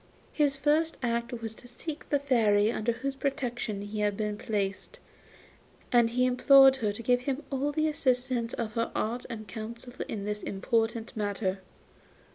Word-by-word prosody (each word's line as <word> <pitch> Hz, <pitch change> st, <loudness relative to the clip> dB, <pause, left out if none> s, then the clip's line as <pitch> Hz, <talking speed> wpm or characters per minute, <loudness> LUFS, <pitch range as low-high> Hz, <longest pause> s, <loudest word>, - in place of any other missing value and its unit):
His 285 Hz, -3 st, +2 dB
first 305 Hz, +3 st, +2 dB
act 235 Hz, 0 st, -1 dB
was 225 Hz, -1 st, -4 dB
to 245 Hz, -, -14 dB
seek 295 Hz, +5 st, -7 dB
the 290 Hz, -, +3 dB
Fairy 225 Hz, -6 st, +3 dB
under 235 Hz, 0 st, 0 dB
whose 265 Hz, +4 st, -3 dB
protection 245 Hz, -7 st, -3 dB
he 210 Hz, +1 st, -5 dB
had 205 Hz, -1 st, +1 dB
been 210 Hz, -1 st, -1 dB
placed, 205 Hz, -, -3 dB, 0.9 s
and 240 Hz, -2 st, +5 dB
he 250 Hz, +2 st, +2 dB
implored 270 Hz, +1 st, +7 dB
her 215 Hz, -5 st, 0 dB
to 210 Hz, +3 st, -7 dB
give 245 Hz, +1 st, +3 dB
him 275 Hz, +3 st, -2 dB
all 275 Hz, +2 st, 0 dB
the 310 Hz, +2 st, +1 dB
assistance 255 Hz, -5 st, 0 dB
of 220 Hz, -2 st, -3 dB
her 230 Hz, +1 st, -1 dB
art 235 Hz, +3 st, -2 dB
and 215 Hz, -3 st, -6 dB
counsel 230 Hz, +4 st, -7 dB
in 200 Hz, -2 st, -4 dB
this 210 Hz, 0 st, -3 dB
important 225 Hz, +3 st, -1 dB
matter. 200 Hz, -2 st, -1 dB
235 Hz, 165 wpm, -29 LUFS, 215-270 Hz, 0.9 s, implored